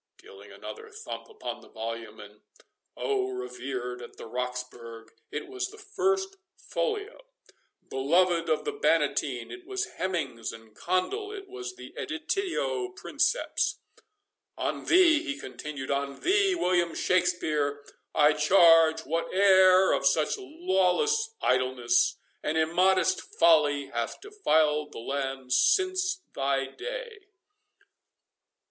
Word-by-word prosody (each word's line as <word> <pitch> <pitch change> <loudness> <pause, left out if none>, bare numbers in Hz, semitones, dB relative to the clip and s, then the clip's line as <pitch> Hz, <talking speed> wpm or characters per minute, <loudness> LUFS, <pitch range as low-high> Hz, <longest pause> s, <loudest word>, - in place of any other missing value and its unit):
— - - -60
(dealing - - -14
another 445 0 -9
thump 440 +2 -8
upon 445 0 -7
the - - -17
volume—and 110 -2 -7 0.6
oh! 395 -3 0
revered 130 - -5
of 120 - -11
the - - -9
Roxburghe, 120 -2 -6 0.2
it 390 - -5
was 385 0 -3
the 430 +2 -13
first 390 -2 -1 0.2
folio—beloved 185 - -2
of 155 - +1
the - - -1
Bannatyne, 425 - 0
it 360 -1 -10
was 390 +1 -2
Hemmings 135 -12 -2
and 115 -1 -14
Condel—it 395 - -2
was 385 0 -7
the - - -11
editio 380 +2 -2
princeps)—"On 420 -1 -3
thee," 335 -3 +5
he 295 -3 -4
continued—"on 140 - -4
thee, 390 0 +3
William 175 - +1
Shakspeare, 155 -6 0 0.3
I 150 0 +5
charge 160 0 +5
whate'er 185 +3 +4
of - - +2
such - - +2
lawless 370 - +1
idleness 130 -1 +2 0.2
and 155 - -1
immodest 185 +3 +3
folly 150 -4 +3
hath 120 -1 -3
defiled 155 - +1
the - - -9
land 135 +1 -3
since 370 - +2
thy 135 0 0
day!" 465 - -7
185 Hz, 110 wpm, -28 LUFS, -, 0.6 s, thee